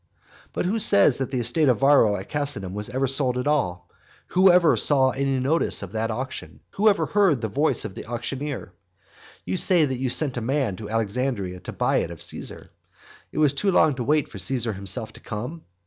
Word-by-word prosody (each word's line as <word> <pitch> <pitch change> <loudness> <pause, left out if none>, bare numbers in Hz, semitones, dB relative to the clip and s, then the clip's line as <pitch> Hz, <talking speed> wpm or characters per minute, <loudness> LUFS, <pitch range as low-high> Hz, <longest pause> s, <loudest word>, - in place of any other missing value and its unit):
But - - -3
who 210 +5 0
says 200 - +4
that 135 - -3
the 130 - -3
estate 135 +6 +2
of 125 - +3
Varro 135 -7 +5
at 95 - -7
Casinum 140 -11 -2
was 105 +3 -4
ever 130 +2 -1
sold 130 -1 0
at 125 - -2
all? 90 -13 -1 0.4
who 185 +1 +5
ever 175 -2 +4
saw 135 -3 +3
any 135 0 -1
notice 140 -3 0
of 95 - -8
that 110 +1 -2
auction? 130 +4 -6
Who 215 +2 +3
ever 205 - +1
heard 195 -10 +2
the 110 - -1
voice 135 +4 0
of - - -6
the - - -9
auctioneer? 125 -1 -5 0.7
You 95 +1 -2
say 175 -4 +3
that 130 -3 -3
you 130 -1 -1
sent 135 0 +3
a - - -2
man 130 -4 -1
to 105 -2 -8
Alexandria 110 -4 -2
to - - -8
buy - - 0
it - - -1
of 85 -2 -8
Caesar. - - -7 0.6
It - - -10
was 150 -2 +3
too 170 +8 0
long 155 -5 +4
to 125 -2 -4
wait 150 +2 +1
for - - -10
Caesar 120 -4 -1
himself 100 +4 -4
to - - -13
come! 125 +10 -7
130 Hz, 210 wpm, -24 LUFS, 110-150 Hz, 0.7 s, Varro